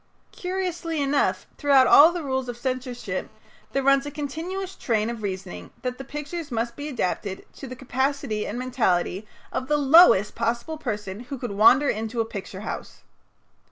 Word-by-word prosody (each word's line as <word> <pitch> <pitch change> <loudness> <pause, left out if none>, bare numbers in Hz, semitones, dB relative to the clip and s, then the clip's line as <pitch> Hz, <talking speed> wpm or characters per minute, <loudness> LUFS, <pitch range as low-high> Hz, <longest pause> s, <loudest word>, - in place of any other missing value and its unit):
Curiously 360 -3 -3
enough, 280 0 +1
throughout 280 -3 +5
all 305 +6 +8
the 345 -2 -4
rules 265 -2 -2
of 240 - -5
censorship 255 -1 -4 0.4
there 275 - 0
runs 275 +1 +4
a - - -2
continuous 325 +7 -5
train 225 -1 0
of 235 -2 -7
reasoning 185 - -5
that 250 0 -3
the - - -5
pictures 295 +3 -6
must 235 -1 -2
be 290 +1 -6
adapted 200 -6 -3
to 270 - -8
the 255 - -7
capacity 265 -3 -2
and 220 - -4
mentality 215 -6 0 0.3
of 260 - -2
the 295 +1 +2
lowest 280 - +6
possible 235 +7 -2
person 210 -7 -4
who 250 +3 -7
could 245 -3 -5
wander 235 +8 +5
into 225 +1 -2
a 225 - +2
picture 200 -3 -7
house. 215 - -7
255 Hz, 165 wpm, -25 LUFS, 225-290 Hz, 0.4 s, all